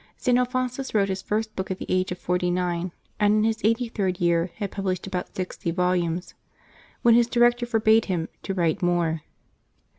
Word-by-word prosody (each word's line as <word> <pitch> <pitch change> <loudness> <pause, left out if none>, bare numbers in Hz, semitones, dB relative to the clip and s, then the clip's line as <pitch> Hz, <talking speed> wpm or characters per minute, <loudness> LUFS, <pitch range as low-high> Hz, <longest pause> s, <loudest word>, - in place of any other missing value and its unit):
St. 250 -2 +2
Alphonsus 250 0 -1
wrote 200 -2 +3
his 190 0 -2
first 215 +2 -2
book 190 - -4
at 190 - -2
the - - -6
age 185 0 0
of 180 - -3
forty 180 0 0
nine, 175 0 -1 0.3
and 210 0 +4
in 215 - +3
his 225 0 0
eighty 230 +3 +2
third 190 -5 -2
year 170 0 +2
had 205 -3 -4
published 190 -2 -2
about 185 -2 -5
sixty 185 -2 -4
volumes, 175 0 0 0.7
when 235 - +6
his 235 0 +5
director 240 0 +3
forbade 225 -1 +4
him 170 -4 -1
to 195 - -4
write 170 -3 +1
more. 170 -3 +1
190 Hz, 185 wpm, -25 LUFS, 180-225 Hz, 0.7 s, when